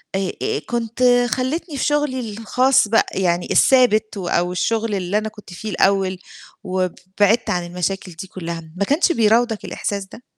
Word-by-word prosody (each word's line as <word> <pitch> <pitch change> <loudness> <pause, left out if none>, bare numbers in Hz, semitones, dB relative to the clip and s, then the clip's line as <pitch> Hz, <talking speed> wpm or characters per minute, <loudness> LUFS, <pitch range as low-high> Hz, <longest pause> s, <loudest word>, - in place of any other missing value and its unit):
آآ 190 -1 -1
آآ - - 0
كنت 235 +1 -2 0.3
خلّيتني 285 +5 -2
في - - -1
شُغلّي 295 -3 0
الخاص 250 +3 +2
بقى، 225 +2 +3
يعني 175 -2 0
الثابت 220 -5 +4
و 185 -3 -4
أو 175 +1 +1
الشُّغل 220 +4 -1
اللي 190 +1 -1
أنا 215 +1 -2
كنت 210 -4 -14
فيه 215 +5 -6
الأول، 190 -1 +1 0.4
وبعدت 190 +4 0
عن 175 -1 -1
المشاكل 180 +2 -3
دي 170 +3 -9
كُلّها."، 170 -3 -6
ما 200 +2 0
كانش 305 - +2
بيراودك 225 -3 +2
الإحساس 200 -1 -3
ده؟ 225 +5 -14
205 Hz, 160 wpm, -20 LUFS, 185-235 Hz, 0.4 s, الثابت